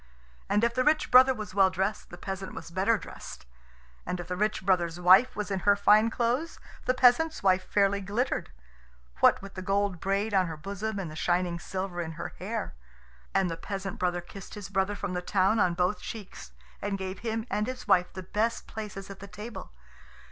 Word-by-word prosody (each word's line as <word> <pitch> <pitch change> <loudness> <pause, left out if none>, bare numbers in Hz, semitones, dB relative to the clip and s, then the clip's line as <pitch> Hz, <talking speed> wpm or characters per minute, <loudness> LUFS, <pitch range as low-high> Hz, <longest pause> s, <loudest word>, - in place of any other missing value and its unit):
And 205 +2 +2
if 235 0 +2
the 255 +1 +1
rich 305 +2 +2
brother 255 +1 +8
was 215 -4 -7
well 195 -1 +5
dressed, 190 +3 -2
the 175 - -10
peasant 190 +1 -6
was 165 0 -8
better 195 +6 +2
dressed; 180 - -10 0.6
and 180 - -3
if 175 - -6
the 180 - -1
rich 210 0 -1
brother's 175 -3 +1
wife 190 +9 +6
was 210 -1 -3
in 195 - 0
her 205 +2 +4
fine 210 +2 +5
clothes, 245 +8 -1 0.3
the 255 - +2
peasant's 255 +5 +4
wife 185 -1 +3
fairly 200 0 +2
glittered 210 +7 -1 0.7
what - - +5
with 195 - -9
the 185 - -6
gold 195 -1 0
braid 200 +4 -1
on 190 -2 +3
her 160 -1 -6
bosom 200 +5 -4
and 180 -5 -4
the - - -9
shining 175 +1 0
silver 185 0 -4
in 160 -1 -5
her 170 - -5
hair. - - -4 0.6
And 195 -1 +3
the 165 -1 -4
peasant 195 +3 -5
brother 175 -1 0
kissed 195 +4 -11
his 205 -2 -7
brother 195 +1 0
from 200 -2 -4
the 180 - -2
town 195 +4 +2
on 175 -4 +3
both 180 +3 0
cheeks, 200 - -8 0.3
and 200 -1 -2
gave 190 0 -5
him 225 -1 -3
and 210 +2 0
his 255 0 -6
wife 180 0 +4
the 185 - -7
best 220 +5 -1
places 200 -3 -7
at 195 - -10
the 200 - -9
table. 210 +5 -8
195 Hz, 205 wpm, -28 LUFS, 185-215 Hz, 0.7 s, brother